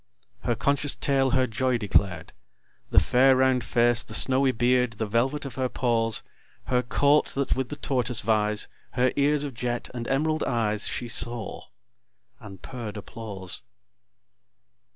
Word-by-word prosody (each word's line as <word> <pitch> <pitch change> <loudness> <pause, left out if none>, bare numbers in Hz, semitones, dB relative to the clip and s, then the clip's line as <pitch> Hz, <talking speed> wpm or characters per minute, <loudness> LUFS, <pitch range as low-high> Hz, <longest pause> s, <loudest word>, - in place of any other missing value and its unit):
Her 120 - -1
conscious 140 +4 0
tail 135 -1 +1
her 130 0 +2
joy 125 +2 0
declared; 100 -5 0 0.6
The - - +6
fair 130 +2 +4
round 130 -1 +2
face, 120 0 +3
the 115 -3 -1
snowy 130 0 +4
beard, 125 0 +1
The 110 +1 -3
velvet 130 +7 -1
of 135 - -6
her 130 - 0
paws, 115 -3 +1 0.4
Her 125 -1 +1
coat, 145 +4 +2
that 140 0 0
with 130 -2 -3
the - - -5
tortoise 125 -5 -1
vies, 105 -1 +1 0.3
Her 125 0 +2
ears 145 +1 +2
of 140 -2 -5
jet, 120 +1 -4
and 120 -1 -5
emerald 155 +3 0
eyes, 110 -4 -1
She 120 - -4
saw; 115 -2 -3 0.7
and 95 -3 -12
purr'd 110 -5 -7
applause. 100 -3 -5
125 Hz, 150 wpm, -26 LUFS, 115-130 Hz, 0.7 s, The